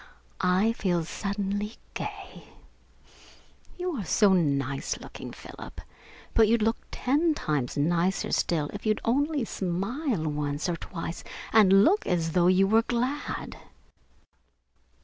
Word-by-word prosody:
I 185 +5 +3
feel 175 -6 0
suddenly 205 +3 -3 0.2
gay. - - -7 1.3
You 360 0 -2
are 210 - -3
so 200 +2 +4
nice 140 -5 0
looking, - - -9
Philip, - - -10 0.5
but 225 -1 +5
you'd 230 0 +3
look 225 +1 +2
ten 300 +5 +1
times 145 - -2
nicer 170 +5 +1
still 155 -4 0
if - - -7
you'd 215 -1 +1
only 285 +2 +1
smile 200 - -2
once 145 0 -2
or 175 - 0
twice 165 0 -6 0.3
and 195 -2 +7
look 395 - +3
as 165 -3 0
though 175 +1 +3
you 185 +1 +5
were 220 +3 +4
glad." 250 +5 -3
195 Hz, 125 wpm, -27 LUFS, 170-230 Hz, 1.3 s, and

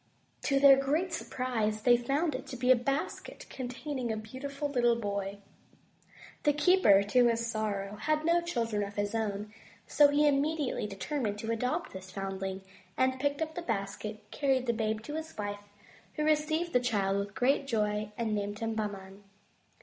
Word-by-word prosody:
To 275 -1 +3
their 275 -1 +8
great 310 +7 0
surprise 225 -8 -2
they 245 -1 +6
found 280 +6 0
it 255 - -5
to 255 - -6
be 250 +1 +3
a - - +8
basket 275 +5 -3
containing 255 -1 -4
a 220 - -2
beautiful 275 +6 -5
little 240 -4 +2
boy. 200 -3 -3 1.0
The 295 - +3
keeper, 295 - +5
to 240 +4 +4
his 230 0 +1
sorrow, 210 -3 -3
had 310 +6 0
no 340 +1 +4
chil 305 -10 -1
dren 210 -2 -2
of 200 0 -4
his 205 0 -1
own, 210 -1 -2 0.3
so 295 - +6
he 290 +1 +3
immediately 290 -4 0
determined 210 +1 -3
to 225 +2 -3
adopt 250 +9 -2
this 190 0 -9
foundling, 195 0 -4 0.3
and 260 0 +2
picking 285 +3 0
up 315 0 -6
the 350 - -4
basket, 210 -3 -4
carried 265 -3 +1
the 235 - +1
babe 220 -1 -1
to 295 - -7
his 320 +1 -6
wife, 205 -1 -4 0.5
who 305 - -1
received 310 +2 +1
the 250 - +5
child 200 -5 0
with 200 0 -5
great 275 +2 +2
joy 210 -3 0
and 225 -2 -1
named 205 0 -2
him 225 0 -2
Bahman. 200 -2 -5
235 Hz, 175 wpm, -30 LUFS, 210-285 Hz, 1.0 s, their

